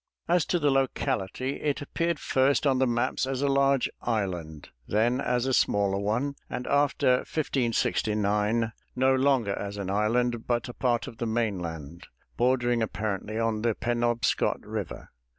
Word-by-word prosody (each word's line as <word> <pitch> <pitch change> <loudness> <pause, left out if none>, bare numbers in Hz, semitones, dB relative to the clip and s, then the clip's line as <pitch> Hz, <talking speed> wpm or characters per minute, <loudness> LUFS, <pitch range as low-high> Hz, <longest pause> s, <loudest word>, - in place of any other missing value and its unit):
As 175 -2 +2
to 175 - +2
the 145 -4 +2
locality, 130 -2 -1
it 145 -2 0
appeared 165 +3 -1
first 135 0 +2
on 135 -2 +3
the 130 - +3
maps 120 +2 0
as 135 0 -2
a - - +3
large 140 -1 +3
island, 90 -9 -3 0.2
then 120 +5 +1
as 125 0 0
a 130 - 0
smaller 100 -4 +2
one, 115 +8 -1 0.2
and 125 - -4
after 140 -3 +3
1569 110 -5 0 0.2
no 130 +1 +3
longer 130 -6 +2
as 100 +1 -5
an 95 -1 -3
island, 115 +3 0
but 120 0 0
a 120 - -7
part 120 -2 0
of 115 - -10
the 115 - -1
mainland, 85 -8 -3 0.3
bordering 120 -1 +2
apparently 110 -1 -3
on 115 -1 0
the 115 -1 +1
Penobscot 120 -1 0
River. - - -6
120 Hz, 150 wpm, -27 LUFS, 105-130 Hz, 0.3 s, on